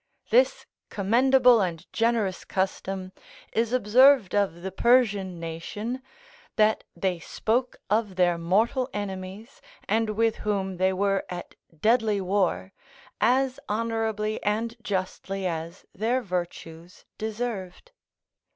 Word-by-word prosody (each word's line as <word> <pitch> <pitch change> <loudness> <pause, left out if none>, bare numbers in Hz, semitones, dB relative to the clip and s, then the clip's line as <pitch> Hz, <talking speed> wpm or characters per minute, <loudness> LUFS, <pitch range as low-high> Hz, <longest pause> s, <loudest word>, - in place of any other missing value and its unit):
This - - +3 0.2
commendable 245 +3 +4
and 175 -2 -3
generous 225 -5 0
custom 190 0 -3 0.4
is 230 0 +1
observed 255 -1 +5
of 190 -4 0
the 190 - -4
Persian 205 -5 +2
nation, 205 +10 -5 0.5
that 215 0 +3
they 180 0 -1
spoke 240 +9 -1
of 210 -2 0
their 175 -2 +2
mortal 225 +9 +1
enemies 200 +3 -6 0.3
and 225 0 +1
with 225 +1 +1
whom 195 -3 -2
they 185 +1 +2
were 195 +1 +1
at 175 -1 -7 0.3
deadly 220 -2 +3
war, 190 0 0 0.5
as 260 +2 +2
honourably 220 -1 -1
and 225 +3 -1
justly 195 -1 -3
as 170 +1 -4
their 240 +5 0
virtues 175 -2 -6
deserved. 220 - -5
205 Hz, 110 wpm, -26 LUFS, 185-230 Hz, 0.5 s, observed